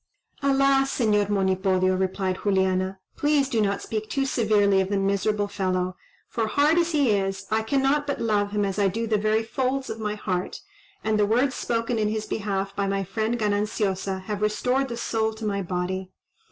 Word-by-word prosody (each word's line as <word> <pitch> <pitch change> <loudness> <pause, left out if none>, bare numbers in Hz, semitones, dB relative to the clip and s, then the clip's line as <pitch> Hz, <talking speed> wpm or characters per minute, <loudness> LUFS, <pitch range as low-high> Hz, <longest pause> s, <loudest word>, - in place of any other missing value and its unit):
"Alas! 275 -1 +3
Señor 210 -4 +2
Monipodio," 190 -1 +2
replied 185 0 -1
Juliana, 190 -1 +1 0.2
"please 290 -2 +2
do 230 -4 0
not 200 -1 0
speak 215 -1 -4
too 275 -1 0
severely 205 -6 +3
of 190 - -2
the 200 - 0
miserable 200 +1 +1
fellow; 185 -2 -1 0.3
for, 225 -1 -1
hard 295 +8 +3
as 340 0 +1
he 285 -7 +3
is, 195 -1 -1
I 220 +1 +2
cannot 275 +5 +1
but 280 - -2
love 210 -3 +1
him 205 0 0
as 195 +1 -2
I 200 - +4
do 225 +5 -2
the 215 -2 +1
very 215 +2 +1
folds 260 +3 -2
of 225 - -6
my 210 -1 -2
heart; 185 -3 -3 0.4
and 215 -1 +1
the 205 - +3
words 250 +5 +2
spoken 230 -1 -1
in 215 - +1
his 215 0 -2
behalf 195 -2 -3
by 200 0 0
my 195 0 0
friend 220 +5 -1
Gananciosa 205 -3 -1
have 210 +1 -4
restored 250 +6 +1
the 235 -2 -5
soul 220 -1 -1
to 220 0 -6
my 200 -1 -1
body. 185 +1 -3
210 Hz, 190 wpm, -25 LUFS, 195-230 Hz, 0.4 s, I